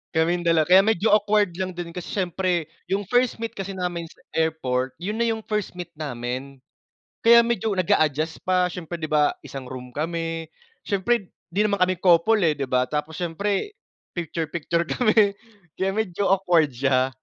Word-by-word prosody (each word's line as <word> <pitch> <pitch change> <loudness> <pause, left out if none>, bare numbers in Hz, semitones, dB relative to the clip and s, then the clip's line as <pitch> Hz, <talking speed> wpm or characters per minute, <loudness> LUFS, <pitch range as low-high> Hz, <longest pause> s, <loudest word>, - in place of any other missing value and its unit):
Kaming 170 +2 +1
dala 165 -2 +4
kaya 180 +4 +7
medyo 220 0 +2
awkward 205 -2 +3
lang 185 -1 -3
din, 175 -1 -5
kasi 175 0 -7
syempre 180 -3 -1 0.2
yung 195 +2 0
first 245 +3 +1
meet 225 - -3
kasi 195 -3 -6
namin 175 -2 -3
sa - - -21
airport, 130 -5 -1
yun 210 +6 -4
na 235 - +2
yung 220 -1 -2
first 210 -4 -3
meet 175 -2 -7
namin. 130 -1 -5 0.6
Kaya 235 0 +9
medyo 230 -2 0
nag-a-adjust 155 -3 +1
pa, 180 -1 +2
syempre, 175 -1 -6
di 155 - -3
ba, 150 -1 +3
isang 135 -2 -7
room 125 -1 -8
kami. 165 +2 -3 0.4
Syempre, 200 +1 0 0.2
di 205 +5 +1
naman 200 -3 0
kami 185 0 +3
couple, 180 +5 +4
eh, 155 - +3
di 140 - -3
ba, 125 0 +2
tapos 150 +1 -3
syempre, 200 - -2 0.4
picture-picture 170 0 -2
kami, 215 -4 +3 0.4
kaya 190 - 0
medyo 200 -2 -1
awkward 175 -5 +3
siya 130 +1 +1
175 Hz, 165 wpm, -24 LUFS, 155-200 Hz, 0.6 s, Kaya